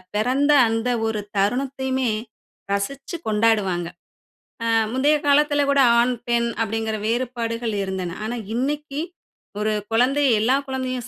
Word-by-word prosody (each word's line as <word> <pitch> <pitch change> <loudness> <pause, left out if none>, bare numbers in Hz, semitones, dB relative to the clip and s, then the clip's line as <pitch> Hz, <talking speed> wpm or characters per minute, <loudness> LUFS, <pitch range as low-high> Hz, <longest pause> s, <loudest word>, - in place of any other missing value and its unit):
பிறந்த 260 +7 +2 0.2
அந்த 225 +2 -1 0.2
ஒரு 220 -1 -2 0.2
தருணத்தையுமே 260 +3 0 0.6
ரசிச்சு 275 - -3
கொண்டாடுவாங்க. 210 -5 +1 0.8
ஆ - - -2 0.3
முந்தைய 285 +4 +3
காலத்துல 290 0 +4
கூட 280 -1 +4 0.2
ஆண், 250 +1 +3 0.2
பெண் 235 0 +2
அப்பிடிங்குற 220 0 -1
வேறுபாடுகள் 230 -1 -2
இருந்தன. 185 -2 -4
ஆனா, 235 +2 -3 0.2
இன்னைக்கி 290 +3 -2 0.6
ஒரு 215 0 +1 0.2
குழந்தை, 260 +5 +2 0.2
எல்லா 255 +5 +3
குழந்தையும் 255 -2 -3
245 Hz, 115 wpm, -22 LUFS, 220-270 Hz, 0.8 s, காலத்துல